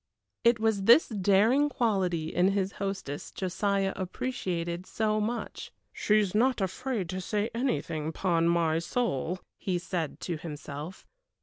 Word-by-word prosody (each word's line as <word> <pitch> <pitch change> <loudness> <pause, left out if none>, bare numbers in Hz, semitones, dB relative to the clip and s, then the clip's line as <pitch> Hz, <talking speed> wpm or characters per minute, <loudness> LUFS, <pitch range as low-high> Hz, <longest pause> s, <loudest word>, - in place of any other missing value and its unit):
It 235 -1 +4
was 220 -3 +1
this 235 +9 +7
daring 215 +7 +3
quality 185 - 0
in 185 +3 +3
his 195 -1 0
hostess 195 -8 -4
Josiah 195 +1 0
appreciated 180 -4 -3
so 215 -1 0
much. 235 +3 -4 0.2
"She's 210 -3 +2
not 245 +3 +3
afraid 200 +2 -2
to 185 +1 -3
say 210 +4 -1
anything, 230 - -1
'pon 170 -1 +1
my 165 -2 +2
soul," 180 - -1 0.2
he 185 -2 -1
said 175 -3 -3
to 170 -3 -3
himself. 150 +2 -7
190 Hz, 130 wpm, -29 LUFS, 170-220 Hz, 0.2 s, this